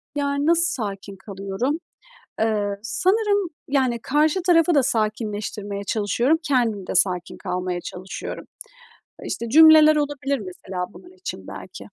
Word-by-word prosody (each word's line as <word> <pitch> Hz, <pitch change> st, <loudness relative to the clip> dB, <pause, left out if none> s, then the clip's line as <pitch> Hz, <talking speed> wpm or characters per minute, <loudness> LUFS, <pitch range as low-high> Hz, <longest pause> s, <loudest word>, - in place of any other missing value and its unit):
Yani, 280 Hz, 0 st, -1 dB
nasıl 335 Hz, +1 st, +4 dB, 0.2 s
sakin 200 Hz, 0 st, -6 dB
kalıyorum? 195 Hz, +8 st, -3 dB, 0.6 s
Eee, 210 Hz, -2 st, 0 dB
sanırım, 400 Hz, -, +1 dB, 0.2 s
yani, 260 Hz, -4 st, +1 dB
karşı 300 Hz, +7 st, +2 dB
tarafı 335 Hz, -1 st, +4 dB
da 280 Hz, -, +4 dB
sakinleştirmeye 210 Hz, -3 st, -2 dB
çalışıyorum, 235 Hz, +9 st, +1 dB
kendim 235 Hz, -, 0 dB
de -, -, -4 dB
sakin 180 Hz, -2 st, +1 dB
kalmaya 180 Hz, 0 st, -3 dB
çalışıyorum. 185 Hz, +2 st, -7 dB, 0.8 s
İşte, 235 Hz, -, -4 dB
cümleler 310 Hz, +2 st, +8 dB
olabilir, 285 Hz, -1 st, -1 dB
mesela, 185 Hz, -2 st, -6 dB
bunun 360 Hz, -, -14 dB
için 375 Hz, -, -7 dB
belki. -, -, -9 dB
235 Hz, 120 wpm, -23 LUFS, 200-300 Hz, 0.8 s, cümleler